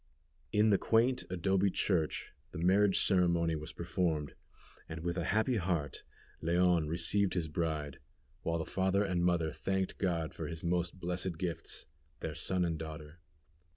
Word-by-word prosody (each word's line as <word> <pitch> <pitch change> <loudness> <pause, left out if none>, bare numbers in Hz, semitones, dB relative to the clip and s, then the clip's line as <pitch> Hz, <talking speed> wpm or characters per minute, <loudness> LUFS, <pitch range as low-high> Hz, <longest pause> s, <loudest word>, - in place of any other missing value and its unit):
In 105 +1 +4
the 100 - +4
quaint 125 +3 +2
adobe 95 +2 +2
church 90 -4 0 0.2
the - - -5
marriage 95 +3 +4
ceremony 85 -4 +2
was 75 0 -6
performed, 80 -5 -1 0.6
and 80 0 -6
with 85 +1 -2
a 85 -3 -2
happy 110 +5 +2
heart 85 -7 -2 0.4
Leon 85 -1 +3
received 90 +5 +2
his 85 -3 0
bride, 75 -2 -2 0.4
while 85 0 -1
the 80 - -3
father 95 +3 +1
and 90 -3 0
mother 85 -3 +2
thanked 95 +2 -2
God 85 -4 -1
for - - -5
His 80 -1 -5
most 90 +1 0
blessed 90 -1 -2
gifts, 85 -1 -2 0.3
their 80 - -4
son 90 +2 +1
and 80 -2 -2
daughter. 80 0 -8
85 Hz, 155 wpm, -33 LUFS, 80-95 Hz, 0.6 s, In